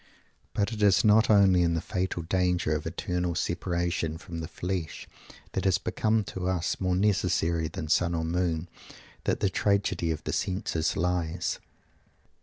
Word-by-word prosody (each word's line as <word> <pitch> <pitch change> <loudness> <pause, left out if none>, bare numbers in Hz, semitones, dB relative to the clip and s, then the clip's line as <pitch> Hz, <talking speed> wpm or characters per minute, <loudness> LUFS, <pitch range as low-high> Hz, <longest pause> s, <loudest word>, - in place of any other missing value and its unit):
But 105 +3 0
it 105 - -5
is 100 -2 +5
not 110 +1 +5
only 100 -4 +6
in 85 -1 +2
the - - +1
fatal 90 0 -2
danger 90 -2 +1
of 75 +1 -3
eternal 90 +1 -2
separation 85 -2 -1
from 85 -1 -7
the 80 - -4
flesh 90 -3 -4 0.4
that - - -2
has 95 -2 +4
become 110 +3 0
to 90 -2 -5
us 90 -2 -1
more 90 -1 +1
necessary 90 -4 +1
than 80 0 -6
sun 85 +2 +2
or 80 -1 -1
moon, 85 -1 -1 0.6
that - - 0
_the 100 - +2
tragedy 100 -4 +1
of 80 -2 -2
the - - -3
senses 90 -4 -1
lies. 85 0 -1
90 Hz, 160 wpm, -28 LUFS, 85-95 Hz, 0.6 s, only